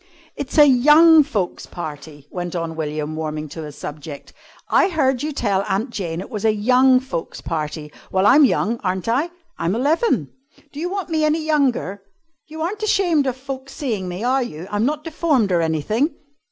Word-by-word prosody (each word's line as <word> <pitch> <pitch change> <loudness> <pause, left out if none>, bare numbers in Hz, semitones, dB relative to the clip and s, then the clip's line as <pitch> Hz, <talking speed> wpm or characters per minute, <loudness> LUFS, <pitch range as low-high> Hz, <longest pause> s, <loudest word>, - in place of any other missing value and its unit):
"It's 285 +2 -5
a 300 - +9
young 300 +5 +7
folks' 220 -12 -3
party," 150 -3 -8
went 175 -1 -5
on 165 -1 -3
William, 155 0 -3
warming 155 -1 -4
to 160 - -7
his 150 -1 -10
subject. 145 -1 -8 0.3
"I - - +3
heard 270 -7 +1
you 305 +1 -2
tell 205 -8 0
Aunt 210 +6 -1
Jane 170 -6 -4
it 190 - -8
was 210 -2 -4
a 220 - +4
young 255 +4 +4
folks' 260 -10 -5
party. 150 -1 -4 0.2
Well, 190 +1 +2
I'm 275 +8 +7
young, 235 -3 +1
aren't 185 0 -2
I? 270 +9 +1 0.3
I'm 170 +4 0
eleven. 285 - +1 0.4
Do 290 - -7
you 350 +3 -2
want 390 -1 -4
me 315 -1 0
any 310 +1 +1
younger? 265 - 0 0.5
You 315 +1 -6
aren't 400 +6 -3
ashamed 350 -9 +2
of 260 -1 -2
folks 265 0 -7
seeing 220 -10 -3
me, 180 +4 -5
are 260 +2 +2
you! 175 -7 -6
I'm 205 +2 +1
not 300 +1 -2
deformed 300 - +1
or 175 -2 +3
anything." 165 - 0
235 Hz, 185 wpm, -21 LUFS, -, 0.5 s, a